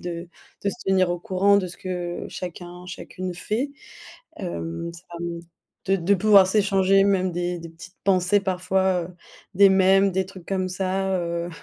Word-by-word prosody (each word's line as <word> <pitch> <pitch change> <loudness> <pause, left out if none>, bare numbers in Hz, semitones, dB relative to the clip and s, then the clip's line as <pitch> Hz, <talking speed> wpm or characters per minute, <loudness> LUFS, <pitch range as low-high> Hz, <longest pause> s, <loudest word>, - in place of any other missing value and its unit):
de 170 0 -6 0.3
de 200 - 0
se - - -5
tenir 185 -2 +3
au 175 - -1
courant 195 +3 +3
de 190 - -2
ce 175 - -9
que 175 -2 -4
chacun, 180 0 -8
chacune 185 0 -6
fait. 225 +10 -2 0.7
Hem, 170 -2 -4
ça 170 +1 -13 0.2
me 170 0 -4 0.4
de 195 - +3
de 185 +3 +2
pouvoir 200 -1 +6
s'échanger 195 -1 +3
même 185 -2 +2
des 175 0 -2
des 165 0 -9
petites 170 +2 -14
pensées 190 +1 +3
parfois, 185 -1 0
heu, 180 - -15 0.4
des 200 +2 +7
mêmes, 190 +1 +4
des 190 +1 0
trucs 185 -2 -12
comme 185 -1 -1
ça, 190 +1 -1
heu,, 170 0 -3
185 Hz, 170 wpm, -24 LUFS, 175-195 Hz, 0.7 s, des